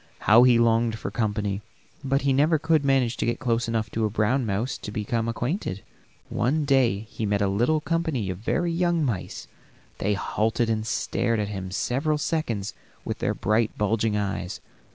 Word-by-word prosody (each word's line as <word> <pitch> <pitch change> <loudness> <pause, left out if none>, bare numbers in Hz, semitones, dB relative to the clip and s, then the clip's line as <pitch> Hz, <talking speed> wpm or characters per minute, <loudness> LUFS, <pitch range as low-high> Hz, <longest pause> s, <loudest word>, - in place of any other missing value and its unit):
How 110 +3 +6
he 125 -1 +6
longed 115 -1 +2
for 100 - -5
company, 105 -2 -1 0.4
but 135 +1 0
he 140 -1 +3
never 150 +4 +3
could 160 -1 +2
manage 135 -3 +2
to - - -1
get 120 - 0
close 120 -1 0
enough 110 -2 -1
to 115 - -1
a 110 - +2
brown 115 +4 +1
mouse 110 +6 -2
to - - -7
become 110 +2 -2
acquainted. 120 - -3 0.4
One 145 +5 0
day 130 -7 +3
he 110 -1 -4
met 100 0 +1
a 100 - +2
little 120 +11 +2
company 155 - -1
of 90 - -7
very 170 +10 0
young 170 -2 +1
mice; 110 -9 -4 0.5
they 105 +1 +1
halted 115 +3 0
and 110 0 -2
stared 115 -2 0
at 105 -1 -2
him 95 -2 -5
several 135 - 0
seconds 120 -10 -2 0.3
with - - -4
their - - 0
bright, 110 +2 0
bulging 105 0 +1
eyes. 95 -2 -3
115 Hz, 180 wpm, -25 LUFS, 105-135 Hz, 0.5 s, How